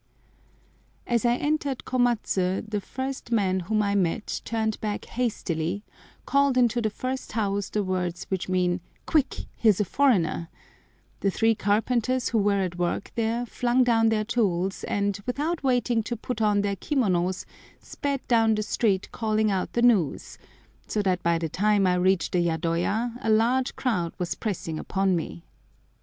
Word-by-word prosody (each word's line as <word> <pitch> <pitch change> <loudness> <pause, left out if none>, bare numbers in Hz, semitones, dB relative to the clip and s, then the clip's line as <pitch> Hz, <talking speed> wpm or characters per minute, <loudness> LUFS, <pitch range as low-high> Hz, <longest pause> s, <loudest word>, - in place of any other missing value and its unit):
As 235 -1 0
I 240 0 +4
entered 285 -1 -1
Komatsu 225 -6 0
the 210 -1 -2
first 260 +3 -5
man 190 -5 +2
whom 210 +4 0
I 200 0 0
met 195 +1 -1
turned 220 -2 -2
back 210 -1 -3
hastily, 200 -6 -2 0.4
called 280 -2 +3
into 240 -1 +3
the 220 - +1
first 255 +5 -5
house 205 -2 -1
the 210 - -1
words 180 -2 -2
which 190 -1 -2
mean 180 -1 +1 0.2
"Quick, 300 -4 0
here's 215 -4 +3
a 210 - +2
foreigner;" 175 - +1 0.7
the 200 - +1
three 225 +4 +2
carpenters 230 +4 +1
who 230 - +1
were 200 -1 +2
at 175 -1 -4
work 175 +2 -1
there 230 +1 -1
flung 245 +2 +1
down 225 -2 +3
their 215 -1 +1
tools 195 -5 0
and, 200 -1 -1
without 305 +7 -1
waiting 245 -3 +2
to 235 +2 -4
put 230 0 -4
on 210 -1 +3
their 200 -1 -1
kimonos, 185 - 0 0.3
sped 280 -2 -4
down 225 -2 +4
the 215 - -1
street 205 -3 0
calling 215 -1 +1
out 190 -2 -2
the 235 - +1
news, 210 - +2 0.5
so 210 - -1
that 185 -2 +1
by 170 -1 +2
the 165 0 -2
time 205 +4 +2
I 180 - +3
reached 180 -1 +2
the 180 - +2
yadoya 175 +8 0
a 225 - -1
large 240 +4 +2
crowd 180 -10 -1
was 180 -1 -2
pressing 165 -7 -4
upon 195 -1 0
me. 170 0 -5
210 Hz, 160 wpm, -26 LUFS, 185-240 Hz, 0.7 s, I